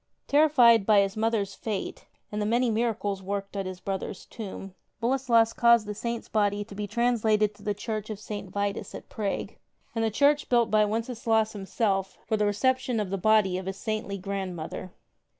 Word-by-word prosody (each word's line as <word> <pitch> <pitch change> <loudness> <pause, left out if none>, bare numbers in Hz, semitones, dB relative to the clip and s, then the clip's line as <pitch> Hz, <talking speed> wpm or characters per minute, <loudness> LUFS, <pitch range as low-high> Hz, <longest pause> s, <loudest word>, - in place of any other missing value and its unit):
Terrified 270 -7 +5
by 210 -2 +6
his 195 0 -1
mother's 215 -3 0
fate 205 0 -5 0.2
and 210 0 -2
the - - 0
many 240 +2 +2
miracles 215 -3 -1
worked 200 +1 -4
at 195 -1 -2
his 185 -1 -6
brother's 190 0 -5
tomb, 195 -3 -8 0.3
Boleslas 235 -2 +3
caused 235 -2 +5
the 210 - -4
Saint's 235 +2 -4
body 205 -1 +1
tO' 205 - -12
be 205 +1 -4
translated 215 -2 +2
to - - -20
the 205 -1 -2
Church 215 0 -4
of 215 -2 -5
St. 205 -2 -6
Vitus 200 +1 -3
at - - -10
Prague, 205 -3 -3 0.4
the 225 -1 +1
church 285 +6 +2
built 235 -3 +3
by 215 -1 +5
Wenceslaus 225 0 0
himself 195 -1 -1
for 220 - 0
the 210 -1 +1
reception 255 +3 +1
of 200 -3 -3
the 195 - 0
body 195 -2 +3
of 190 - -8
his 190 0 -4
saintly 215 -2 -3
grandmother. 185 -2 -5
215 Hz, 180 wpm, -27 LUFS, 200-230 Hz, 0.4 s, by